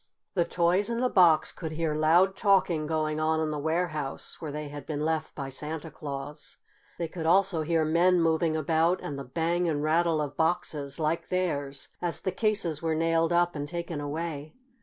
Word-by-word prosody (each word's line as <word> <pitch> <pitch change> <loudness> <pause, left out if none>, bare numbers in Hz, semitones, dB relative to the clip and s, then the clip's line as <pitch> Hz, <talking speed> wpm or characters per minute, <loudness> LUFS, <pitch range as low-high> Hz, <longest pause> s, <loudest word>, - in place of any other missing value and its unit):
The 175 -3 +2
toys 175 +5 +1
in 235 0 -1
the 250 0 +2
box 170 -5 +5
could 160 -3 -6
hear 160 -1 -1
loud 170 +5 +4
talking 185 -7 +2
going 155 -1 -1
on 160 0 +1
in 155 -1 -1
the 150 - -3
warehouse 155 -2 -2
where 155 -3 -5
they 150 0 -5
had 145 -1 -9
been 150 -1 -2
left 160 -1 -2
by 140 -2 -5
Santa 150 +3 -4
Claus. 145 0 -6 0.4
They 170 - -2
could 160 0 -5
also 185 -1 +3
hear 160 0 +1
men 175 +3 +4
moving 165 -1 +2
about 165 +3 +2
and 140 -1 -5
the - - -5
bang 170 +6 0
and 150 -2 -1
rattle 165 +1 +2
of 145 -2 -3
boxes, 155 -3 -1
like 155 +1 -1
theirs, 145 -7 -2
as 175 -1 -1
the 190 - -1
cases 190 -6 0
were 160 -1 0
nailed 165 +1 +2
up 175 0 +2
and 145 0 -3
taken 170 -2 -4
away. 150 0 -5
160 Hz, 190 wpm, -28 LUFS, 150-170 Hz, 0.4 s, box